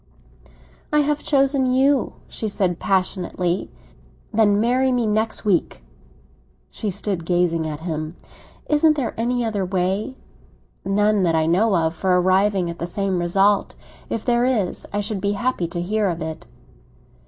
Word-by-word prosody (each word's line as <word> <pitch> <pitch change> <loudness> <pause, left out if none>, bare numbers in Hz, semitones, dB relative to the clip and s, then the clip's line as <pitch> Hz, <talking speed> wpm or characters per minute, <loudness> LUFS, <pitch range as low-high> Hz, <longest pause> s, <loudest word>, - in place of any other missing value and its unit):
"I 300 - +4
have 295 0 0
chosen 275 -2 +2
you!" 265 +1 +2
she 220 - -5
said 190 -4 -1
passionately. 185 -1 -1 0.6
"Then 205 -2 +3
marry 255 +4 +2
me 245 -2 +1
next 215 +1 -1
week." 180 - 0 0.9
She 215 - -3
stood 195 -2 -2
gazing 170 -2 +1
at 150 0 -6
him. 155 -1 -4 0.5
"Isn't 305 +1 +4
there 270 -5 -2
any 240 +1 0
other 210 -3 -1
way?" 190 +6 -1 0.7
"None 205 +1 +2
that 170 -3 +2
I 160 0 +2
know 190 +6 +2
of 160 -1 +1
for 180 +2 +1
arriving 190 0 +2
at 170 0 -6
the 170 - -3
same 190 0 -1
result. 195 +4 +2 0.3
If 225 - -3
there 240 -1 +2
is, 235 -8 0
I 205 - -1
should 205 -1 -3
be 200 +1 0
happy 205 -4 -1
to 175 - -5
hear 205 +4 0
of 170 -1 -3
it." 160 0 -7
200 Hz, 155 wpm, -22 LUFS, 175-230 Hz, 0.9 s, I